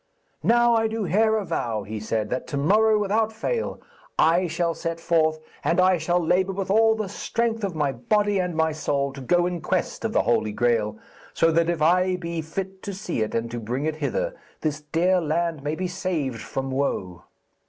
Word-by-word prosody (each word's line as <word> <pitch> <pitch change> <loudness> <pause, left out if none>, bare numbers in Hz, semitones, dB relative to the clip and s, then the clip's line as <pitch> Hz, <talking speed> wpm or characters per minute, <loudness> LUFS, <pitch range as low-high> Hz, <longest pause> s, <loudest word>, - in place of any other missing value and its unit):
'Now 240 0 +4
I 225 -1 +3
do 220 0 -3
here 215 +5 +3
avow,' 120 - -2
he 110 +2 -5
said, 110 0 -2
'that 130 - -2
to 145 - -3
morrow, 215 +9 +4
without 215 +2 +1
fail, 460 - -2 0.4
I 175 +3 +4
shall 170 0 0
set 165 0 -4
forth, 160 -2 +2 0.3
and 170 - +2
I 185 -1 +4
shall 175 +3 +1
labour 180 +3 +1
with 190 0 -3
all 220 +1 +5
the 215 -2 -3
strength 225 +3 -2
of 190 -4 -2
my 145 -3 +1
body 205 - +1
and 180 -2 -1
my 160 0 +2
soul 140 -2 -1
to 135 - -8
go 175 +7 +2
in 175 -2 -2
quest - - -2
of - - -1
the - - +2
Holy 105 -1 +1
Graal, 110 -3 +1 0.4
so 165 0 +4
that 165 +1 +2
if 165 -3 0
I 180 +3 +3
be 170 -2 -4
fit 190 +4 -5
to 200 - -5
see 180 - -3
it 110 - -2
and 115 0 -2
to 120 - -4
bring 125 +6 -3
it 155 -1 -1
hither, - - -1 0.3
this 155 -1 -2
dear 175 +5 +2
land 165 -1 -1
may 145 +2 -2
be 185 +2 -2
saved 165 - -2
from 135 +3 -4
woe.' 95 -10 -2
170 Hz, 205 wpm, -24 LUFS, 145-195 Hz, 0.4 s, all